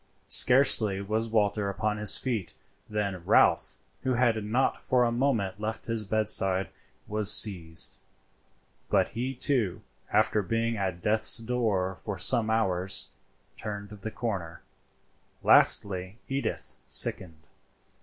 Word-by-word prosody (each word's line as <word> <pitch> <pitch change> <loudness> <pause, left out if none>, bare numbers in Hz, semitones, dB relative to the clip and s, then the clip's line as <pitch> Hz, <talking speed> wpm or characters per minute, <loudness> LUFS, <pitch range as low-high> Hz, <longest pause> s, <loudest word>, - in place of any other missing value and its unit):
Scarcely 120 -6 +6
was 110 +3 -3
Walter 105 -2 -1
upon 105 +2 -3
his 105 -1 +5
feet 115 -8 -5 0.3
than 100 -4 -4
Ralph, - - +2 0.3
who 130 -1 -2
had 115 -3 0
not 120 +6 -2
for 125 -1 0
a 120 - 0
moment 115 -6 -2
left 110 +1 -6
his 115 -2 -4
bedside, 95 -3 0 0.4
was 105 -1 +3
seized, 85 -6 +4 0.9
but - - +1
he 125 +4 -5
too, 120 -8 -1 0.3
after 105 0 +1
being 115 +3 -3
at 95 -4 -5
death's 110 +1 +3
door 110 -6 -2
for 100 +1 -8
some 110 +5 0
hours, 95 -4 0 0.4
turned 100 -1 -8
the 105 +1 -9
corner. 100 -9 -6 0.8
Lastly 95 0 +2
Edith 135 +1 -5
sickened. 80 -4 -2
105 Hz, 120 wpm, -26 LUFS, 95-115 Hz, 0.9 s, Scarcely